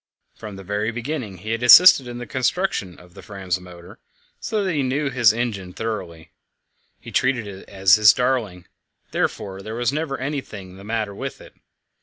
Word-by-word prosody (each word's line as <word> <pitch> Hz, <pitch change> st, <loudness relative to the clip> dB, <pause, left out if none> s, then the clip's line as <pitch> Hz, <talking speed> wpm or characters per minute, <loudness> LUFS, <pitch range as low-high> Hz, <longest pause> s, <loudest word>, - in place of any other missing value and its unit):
From 105 Hz, -2 st, -10 dB
the 95 Hz, -, -10 dB
very 105 Hz, +3 st, -2 dB
beginning 120 Hz, -4 st, -5 dB
he 105 Hz, +5 st, -6 dB
had 115 Hz, +1 st, -2 dB
assisted 130 Hz, +2 st, +8 dB
in 120 Hz, 0 st, -7 dB
the 120 Hz, -, -6 dB
construction 130 Hz, -, -2 dB
of 90 Hz, 0 st, -18 dB
the -, -, -12 dB
Fram's 95 Hz, -3 st, -4 dB
motor, 90 Hz, +3 st, -14 dB, 0.4 s
so 215 Hz, -3 st, -2 dB
that 190 Hz, -3 st, -1 dB
he 145 Hz, -, 0 dB
knew 140 Hz, +2 st, -1 dB
his 120 Hz, -4 st, +4 dB
engine 105 Hz, -6 st, -4 dB
thoroughly. 85 Hz, -8 st, -6 dB, 0.7 s
He -, -, -11 dB
treated 130 Hz, -3 st, +1 dB
it 100 Hz, -2 st, -11 dB
as 95 Hz, -2 st, +3 dB
his 105 Hz, -1 st, +8 dB
darling; 115 Hz, -9 st, -2 dB, 0.5 s
therefore 95 Hz, -1 st, -3 dB
there 110 Hz, +3 st, -7 dB
was 120 Hz, +2 st, -1 dB
never 150 Hz, -2 st, -3 dB
anything 120 Hz, -9 st, -6 dB
the 100 Hz, -, -12 dB
matter 110 Hz, -1 st, -3 dB
with -, -, -7 dB
it. -, -, -15 dB
110 Hz, 180 wpm, -22 LUFS, 95-130 Hz, 0.7 s, assisted